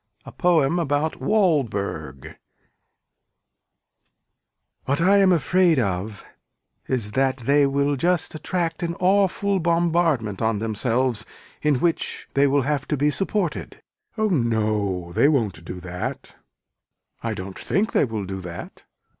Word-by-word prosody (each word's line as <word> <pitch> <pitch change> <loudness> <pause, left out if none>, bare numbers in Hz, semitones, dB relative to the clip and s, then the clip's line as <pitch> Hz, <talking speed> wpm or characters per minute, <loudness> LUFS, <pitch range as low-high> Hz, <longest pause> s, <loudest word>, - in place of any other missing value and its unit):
A - - -9
POEM 170 -2 +2
ABOUT 150 0 0
WALDBERG 105 - -1 2.5
What 140 +2 0
I 190 +4 +4
am 195 -2 +5
afraid 175 +1 +3
of 100 -2 -2 0.6
is 115 -6 -2
that 135 +3 +1
they 140 +3 +3
will 140 +1 +1
just 175 +5 0
attract 165 +2 -2
an 170 -1 -2
awful 195 +1 +2
bombardment 165 - +1
on 110 -1 +1
themselves 115 +2 -1 0.4
in 150 -1 +2
which 165 +6 -1
they 140 +1 +4
will 140 0 +2
have 145 -1 -1
to 150 - -1
be 145 +2 +2
supported. 195 -1 -2 0.3
Oh 215 0 +1
no 105 - 0
they 140 - +4
won't 105 - 0
do 90 +1 -7
that. 90 0 -6 0.9
I 115 -2 -3
don't 95 0 -7
think 200 +3 0
they - - +3
will 110 -5 -4
do 95 0 -5
that. 85 -1 -9
140 Hz, 130 wpm, -23 LUFS, 110-170 Hz, 2.5 s, am